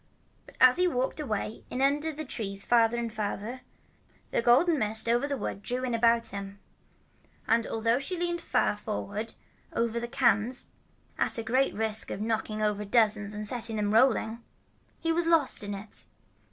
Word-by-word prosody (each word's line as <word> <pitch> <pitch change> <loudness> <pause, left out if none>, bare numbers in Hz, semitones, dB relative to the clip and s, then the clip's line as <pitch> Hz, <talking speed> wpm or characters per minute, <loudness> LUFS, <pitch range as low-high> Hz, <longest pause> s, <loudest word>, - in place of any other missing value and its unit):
But - - -16
as 255 +2 +7
he 360 0 +3
walked 260 -3 -1
away 220 -6 -3
in 250 - -4
under 290 +4 +1
the 310 +1 -6
trees 200 -6 -5
farther 235 -1 +3
and 235 -2 -3
farther, 215 +3 -4 0.7
the - - +1
golden 275 +7 +4
mist 220 0 +2
that 230 - +2
was - - +4
over 280 - -2
the 280 -1 -2
wood 200 - -4
drew 250 +5 -3
in 250 -2 -1
about 230 0 +3
him; 200 0 -7 0.9
and 230 0 +2
although 230 +2 +1
she 320 +7 -3
leaned 345 0 -2
far - - +1
forward 210 +1 -5 0.4
over 235 0 -1
the 235 - -4
cans 240 0 +1 0.5
at - - +2
a 230 - -2
great 255 +5 +1
risk 220 0 0
of - - -4
knocking 215 0 -2
over 210 -1 0
dozens 210 -1 +2
and 210 0 -4
setting 230 0 0
them 210 -1 0
rolling, 230 -1 +2 0.5
he 330 - -1
was 335 0 0
lost 320 -9 +3
in 205 0 -4
it. 200 +2 -6
230 Hz, 180 wpm, -28 LUFS, 215-255 Hz, 0.9 s, as